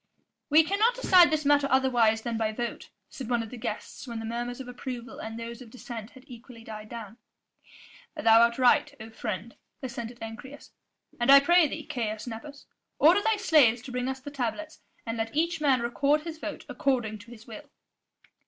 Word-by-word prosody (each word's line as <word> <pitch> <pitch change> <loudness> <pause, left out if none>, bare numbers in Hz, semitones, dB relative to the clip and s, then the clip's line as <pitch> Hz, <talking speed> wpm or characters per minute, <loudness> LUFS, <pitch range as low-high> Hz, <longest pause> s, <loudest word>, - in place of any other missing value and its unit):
"We 310 +2 +6
cannot 425 +8 +2
decide 370 -8 +6
this 305 -1 -1
matter 285 -1 +4
otherwise 240 -5 +3
than 235 -1 -3
by 220 -1 -1
vote," 240 +1 -5 0.2
said 260 -5 -8
one 240 -2 +1
of 225 - -10
the - - -7
guests 220 +4 -6
when 235 -1 -5
the 225 - -5
murmurs 240 +2 -4
of 265 - -8
approval 245 0 -7
and 225 +1 -6
those 235 +2 -7
of 240 - -11
dissent 230 -2 -8
had 260 0 -16
equally 240 -1 -13
died 215 -1 -9
down. 230 -2 -9 1.0
"Thou 230 -7 +5
art 235 0 +3
right, 265 +4 +4
O 225 0 -10
friend," 220 0 -5 0.3
assented 240 -1 -6
Ancyrus, 225 +6 -10 0.5
"and 240 - 0
I 275 - +10
pray 345 +3 +4
thee, - - -7
Caius 215 -3 -4
Nepos, 280 +5 -9 0.3
order 345 +7 +5
thy 445 +1 +2
slaves 280 - +4
to 260 - -9
bring 250 0 -2
us 265 0 -4
the 285 +2 -9
tablets, 285 +4 -4 0.3
and 225 0 -4
let 225 +4 -3
each 330 +1 0
man 270 -4 +3
record 280 +5 +1
his 320 0 -8
vote - - -6
according 240 -6 -1
to 230 +3 -15
his 225 -1 -13
will." 240 +6 -11
245 Hz, 190 wpm, -27 LUFS, 225-285 Hz, 1.0 s, I